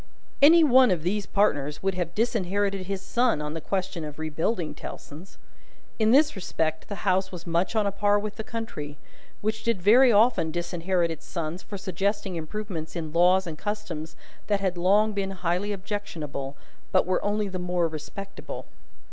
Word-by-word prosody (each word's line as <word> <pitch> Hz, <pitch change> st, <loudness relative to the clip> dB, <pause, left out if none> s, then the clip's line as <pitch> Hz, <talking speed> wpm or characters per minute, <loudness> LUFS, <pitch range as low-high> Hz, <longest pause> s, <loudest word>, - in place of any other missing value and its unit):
Any 325 Hz, +4 st, +8 dB
one 260 Hz, -3 st, +6 dB
of 175 Hz, -4 st, 0 dB
these 200 Hz, +3 st, -1 dB
partners 150 Hz, -8 st, +1 dB
would 195 Hz, 0 st, +1 dB
have 175 Hz, -2 st, -3 dB
disinherited 200 Hz, -3 st, 0 dB
his 195 Hz, -1 st, -3 dB
son 240 Hz, -8 st, +2 dB
on 150 Hz, 0 st, -4 dB
the 165 Hz, -, -5 dB
question 190 Hz, -2 st, -2 dB
of 150 Hz, -1 st, -7 dB
rebuilding 160 Hz, +3 st, -2 dB
Tellson's. 160 Hz, +7 st, -10 dB, 0.6 s
In 220 Hz, 0 st, +3 dB
this 290 Hz, +4 st, +5 dB
respect 160 Hz, -4 st, -2 dB
the 200 Hz, -, -6 dB
House 190 Hz, 0 st, +2 dB
was 180 Hz, -3 st, -8 dB
much 170 Hz, +6 st, 0 dB
on 215 Hz, -2 st, +3 dB
a 200 Hz, -, +1 dB
par 205 Hz, +1 st, +2 dB
with 210 Hz, 0 st, -4 dB
the 220 Hz, -, -4 dB
Country; 185 Hz, -12 st, -6 dB, 0.4 s
which 220 Hz, +1 st, -1 dB
did 230 Hz, -4 st, +1 dB
very 240 Hz, +7 st, +6 dB
often 215 Hz, -6 st, +4 dB
disinherit 175 Hz, +1 st, -1 dB
its 160 Hz, -, -8 dB
sons 170 Hz, +1 st, -4 dB
for 200 Hz, -, -7 dB
suggesting 195 Hz, +1 st, -2 dB
improvements 165 Hz, 0 st, -5 dB
in 160 Hz, -3 st, -4 dB
laws 180 Hz, +2 st, +4 dB
and 160 Hz, -2 st, -6 dB
customs 180 Hz, -7 st, -4 dB, 0.3 s
that 205 Hz, -1 st, +2 dB
had 190 Hz, -2 st, 0 dB
long 205 Hz, +5 st, +3 dB
been 200 Hz, -1 st, -1 dB
highly 180 Hz, +4 st, -1 dB
objectionable, 165 Hz, -9 st, -5 dB, 0.3 s
but -, -, +4 dB
were 185 Hz, +1 st, 0 dB
only 205 Hz, 0 st, 0 dB
the 185 Hz, -1 st, -4 dB
more 180 Hz, -1 st, 0 dB
respectable. 165 Hz, +5 st, -7 dB
190 Hz, 175 wpm, -26 LUFS, 165-210 Hz, 0.6 s, Any